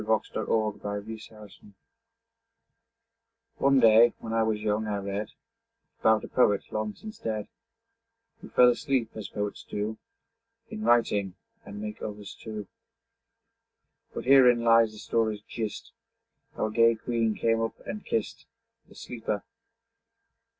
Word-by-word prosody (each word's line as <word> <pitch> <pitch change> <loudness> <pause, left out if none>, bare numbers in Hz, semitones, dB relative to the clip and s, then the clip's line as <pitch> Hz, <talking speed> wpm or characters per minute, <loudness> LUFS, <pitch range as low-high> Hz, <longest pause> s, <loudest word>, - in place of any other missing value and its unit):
XXIX 110 0 0
THE - - -2
POET 105 -2 -1
WHO 110 +1 -7
SLEEPS 105 -2 -14 2.0
One 135 0 +4
day, 115 0 +7
when 115 - -6
I 115 - +2
was 110 -1 0
young, 105 0 -1
I 105 -1 -1
read 100 +2 -4 0.7
About 110 -1 +3
a - - -6
poet, 105 -5 +3
long 110 -1 -3
since 215 0 -10
dead, 110 -2 -3 0.9
Who - - -11
fell 125 0 +6
asleep, 125 -2 0
as 110 -3 -6
poets 105 0 -4
do 105 +1 -4 0.7
In 215 -1 -6
writing 105 - +2 0.3
and 100 +1 -9
make 105 0 -6
others 105 -1 -6
too. 110 -2 -7 1.5
But - - -6
herein 125 -3 +6
lies 115 -1 +5
the 110 - -13
story's 110 -1 -1
gist, 110 -2 -5 0.6
How - - -1
a 110 - -3
gay 115 +1 +4
queen 115 -1 -1
came 115 0 +1
up 115 - -3
and 210 - -6
kist 110 -2 -3 0.4
The - - -17
sleeper. 110 -4 -4
110 Hz, 135 wpm, -28 LUFS, 105-115 Hz, 2.0 s, day